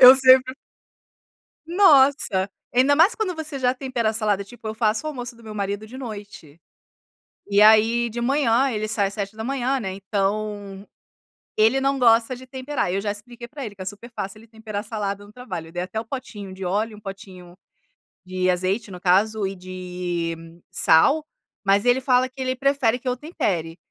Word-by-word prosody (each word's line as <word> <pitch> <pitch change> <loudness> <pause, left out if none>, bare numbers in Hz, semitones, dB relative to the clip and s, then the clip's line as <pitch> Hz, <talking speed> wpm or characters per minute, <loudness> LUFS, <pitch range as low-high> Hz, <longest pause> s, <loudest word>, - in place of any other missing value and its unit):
Eu 255 0 +12
sempre 260 0 +5 1.1
Nossa, 285 - +4 0.3
ainda 260 +4 +4
mais 330 +8 +5
quando 380 -6 -2
você 315 -3 -5
já 250 -1 +2
tempera 255 -4 -1
a - - -2
salada, 210 -2 0
tipo, 225 +2 -11
eu 220 - -4
faço 220 +3 0
o - - -1
almoço 245 -4 -6
do 230 - -18
meu 215 -1 -8
marido 200 +1 -3
de 250 +4 -10
noite, 205 - -9 0.9
e 200 0 +4
aí 220 +2 +5
de 235 +1 -5
manhã, 265 0 +2
ele 215 -2 -2
sai 210 -2 +1
às 200 - -9
7h, 240 +6 -2
né, 190 -4 -4
então 200 0 -3 0.7
ele 225 +5 +4
não 275 0 +1
gosta 230 +1 +4
de 260 +1 -13
temperar, 260 -6 -3
eu 195 - 0
já 205 - -1
expliquei 235 +4 -8
para 285 -3 -7
ele 205 - -8
que 190 - -11
é - - -5
super 205 +4 -7
fácil 195 +2 -5
ele 225 - -17
temperar 220 -2 -6
a 205 - -5
salada 205 -2 -4
no 205 - -16
trabalho, 170 -10 -7
dei 175 - -2
até 190 +4 -4
o 230 - -6
potinho 210 -6 -7
de 190 0 -8
óleo, 210 +4 -1
1 210 - -14
potinho 190 -3 -10 0.7
de 185 0 -2
azeite, 185 +4 0
no 180 -1 -9
caso, 200 +3 +2
e 195 - -5
de 180 -2 -4 0.4
sal, 280 - +4 0.4
mas 200 +1 +4
ele 245 +1 +3
fala 255 -1 +2
que 265 +1 -18
ele 260 0 -1
prefere 260 -3 +1
que 255 - -10
eu 250 - +1
tempere. 180 - -2
220 Hz, 190 wpm, -23 LUFS, 195-255 Hz, 1.1 s, Eu